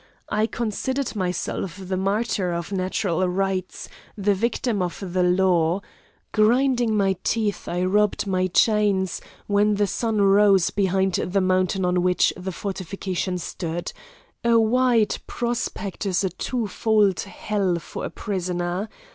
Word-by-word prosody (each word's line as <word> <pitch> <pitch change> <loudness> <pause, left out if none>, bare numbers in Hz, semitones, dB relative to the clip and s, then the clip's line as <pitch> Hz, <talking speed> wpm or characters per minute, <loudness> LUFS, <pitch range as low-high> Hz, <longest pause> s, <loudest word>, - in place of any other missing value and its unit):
I 215 +1 +1
considered 240 +4 -2
myself 180 -1 -2
the 190 0 -3
martyr 195 -1 0
of 170 +3 -4
natural 185 -1 0
rights, 190 0 -2 0.3
the 205 0 +2
victim 225 +1 -1
of 180 -1 -2 0.2
the 185 - +2
law. 180 -1 +2 0.5
Grinding 240 +1 +3
my 195 -2 +2
teeth, 215 -3 -1
I 175 +1 -1
rubbed 210 +3 +2
my 185 -1 +1
chains, 200 -1 +2 0.2
when 205 +1 +2
the 205 0 +2
sun 220 +1 -1
rose 200 -2 +5
behind 190 -1 +1
the 185 +3 0
mountain 185 0 +1
on 180 0 +2
which 180 0 +2
the 185 +1 -5
fortification 190 -1 -3
stood; 170 -1 -4 0.5
a 235 -1 +4
wide 230 -1 +2
prospect 225 -4 -3
is 185 0 +1
a 190 - 0
two 235 +6 -2
fold 210 -2 +2
hell 195 -2 -1
for 170 - -7
a - - -3
prisoner. 180 0 -3
195 Hz, 135 wpm, -23 LUFS, 185-215 Hz, 0.5 s, rose